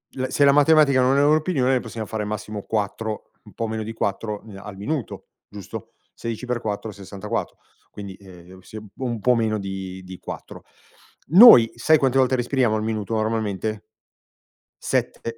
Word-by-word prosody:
L 130 0 -2
se 145 - +1
la 140 - +7
matematica 145 -2 +5
non 130 +2 +3
è 140 - +4
una 150 +2 +5
opinione, 150 -6 0
noi 130 - +3
possiamo 115 -2 -6
fare 110 -1 -4
massimo 105 -1 -5
4, 110 0 -3
un - - -16
po' 115 - -3
meno 110 0 -3
di 110 +1 -6
4, 105 0 -3
ehm, 105 -3 -12
al 105 -2 -9
minuto, 130 +5 -5 0.2
giusto? 100 -2 -9 0.2
Sedici 115 +1 -6
per 125 -1 -2
4 105 0 -4
64, 100 0 -5 0.3
quindi, 100 -2 -9
ehm, 95 -1 -15
s 110 +4 -12 0.2
un 120 -3 -3
po' 125 -1 +3
meno 110 -2 0
di 95 -1 -6
di 95 0 -10
4. - - -9 0.6
Noi, 170 - +9
sai 155 +7 +4
quante 135 -2 +1
volte 130 -1 +3
respiriamo 125 -2 +1
al 110 - -2
minuto 110 -1 -3
normalmente? 110 -1 -2 1.0
7, 115 0 -2
110 Hz, 170 wpm, -23 LUFS, 105-130 Hz, 1.0 s, Noi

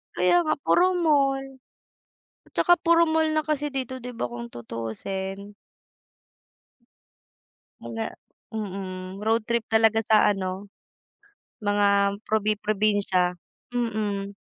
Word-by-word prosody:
Kaya - - +3
nga, 310 - +2
puro 350 - +4 0.2
mall. 275 -3 +2 1.0
At - - -23
saka 350 - +6
puro 335 0 +5
mall 320 0 +2
na 310 0 +1
kasi 295 -1 0
dito, 260 -2 -4
'di 250 - -6
ba, - - 0
kung 120 0 -7
tutuusin. 190 - -6 2.3
Mga 225 0 -5 0.4
mm, 190 -3 -5
road 225 +1 +2
trip 235 -1 +1
talaga 225 0 +4
sa 215 -1 +5
ano, 195 0 -3 1.0
mga 200 -1 +2
probi-probinsya, 205 -3 +1 0.4
mm. 210 -4 -2
210 Hz, 105 wpm, -25 LUFS, 195-245 Hz, 2.3 s, saka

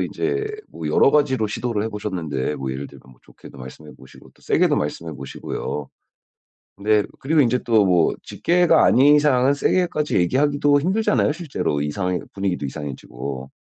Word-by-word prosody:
이제 420 0 -2 0.2
뭐 - - -6
여러 - - +4
가지로 130 -7 +2
시도를 110 0 -2
해 - - -2
보셨는데 85 -10 -3
뭐 65 -1 -4
예를 70 +2 -6
들면 - - -16
뭐 - - -25
좋게도 70 - -15
말씀해 65 +4 -11
보시고 65 - -17
또 - - -27
세게도 - - +2
말씀해 80 +2 -3
보시고요. 70 +1 -6 1.0
네. 105 -1 +3 0.2
그리고 155 +3 +1
인제 125 -2 +3
또 110 -4 +3
뭐 90 -3 +3
직계가 175 0 +2
아닌 145 +4 +5
이상은 140 -2 +3
세게까지 155 0 0
얘기하기도 145 +8 +2
힘들잖아요 210 -1 +1
실제로. 150 - -3
이상해 90 +5 -2
분위기도 95 -7 -2
이상해지고. 65 -2 -7
105 Hz, 385 characters per minute, -21 LUFS, -, 1.0 s, 아닌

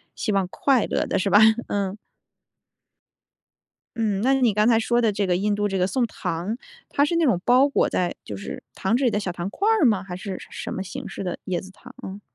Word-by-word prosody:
希 - - -2
望 195 -2 +1
快 255 +6 +2
乐 - - 0
的， - - 0
是 195 - 0
吧？ 205 - +6 0.3
嗯。 200 -1 -2 2.0
嗯， 210 -4 0
那 260 +4 +3
你 250 -5 +3
刚 210 +2 +3
才 230 -2 +5
说 240 +1 +1
的 225 -2 +3
这 200 0 -1
个 180 -1 +1
印 205 +3 0
度 205 0 0
这 195 -1 -2
个 180 0 +2
送 250 +3 +1
糖， 185 +2 -4 0.3
它 285 - +2
是 335 - -1
那 335 -1 +3
种 205 -10 +2
包 255 +3 +5
裹 280 - +1
在 180 -1 0
就 100 - -7
是 100 - -7
糖 195 +4 0
纸 265 - 0
里 240 - +3
的 210 - 0
小 195 -3 -3
糖 175 +1 -4
块 395 - -2
儿 440 -8 +4
吗？ 210 -5 +3
还 180 -2 -7
是 185 0 -6
什 - - -12
什 - - -6
么 190 - -3
形 195 - -7
式 - - -6
的 180 - -3
椰 180 -2 -1
子 190 - -12
糖？ 200 - -15
嗯。 195 +2 -7
205 Hz, 260 characters per minute, -24 LUFS, 190-240 Hz, 2.0 s, 吧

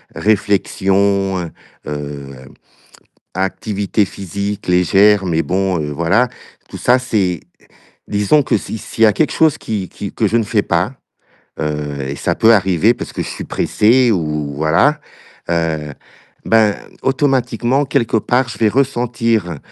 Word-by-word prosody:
réflexion, 100 -1 +1
heu 85 -2 -5 0.4
heu, 70 -2 -6 1.0
activité 100 +2 -1
physique 100 +2 -5
légère, 95 +3 +4
mais 80 -2 +1
bon, 95 -1 -1
heu, 75 0 -4
voilà, 85 - +2 0.4
tout - - -8
ça 125 +1 +3
c'est 100 -9 -1 0.7
disons 105 +9 +2
que 115 - +1
si 110 - -6
s'il 115 +1 -2
y - - +8
a 105 - +3
quelque 155 - 0
chose 160 -3 +3
qui 100 -4 -4
qui 100 - -7
que 110 - +1
je 115 - +1
ne 115 - +1
fais 105 -1 0
pas, 90 +8 0 0.7
heu 75 -2 -3
et 70 - -4
ça - - -1
peut 115 +1 +5
arriver 95 +3 +3
parce - - -7
que - - -3
je - - -6
suis - - -6
pressé 120 +3 +2
ou, 75 -5 -2
voilà, 80 - +2 0.5
heu, 80 -3 -1 0.5
ben, 110 -2 +3 0.3
automatiquement, 135 -1 +1
quelque 125 -4 0
part, 125 +3 +1
je 110 - -7
vais 110 -2 +3
ressentir 115 - 0
100 Hz, 145 wpm, -17 LUFS, 85-115 Hz, 1.0 s, y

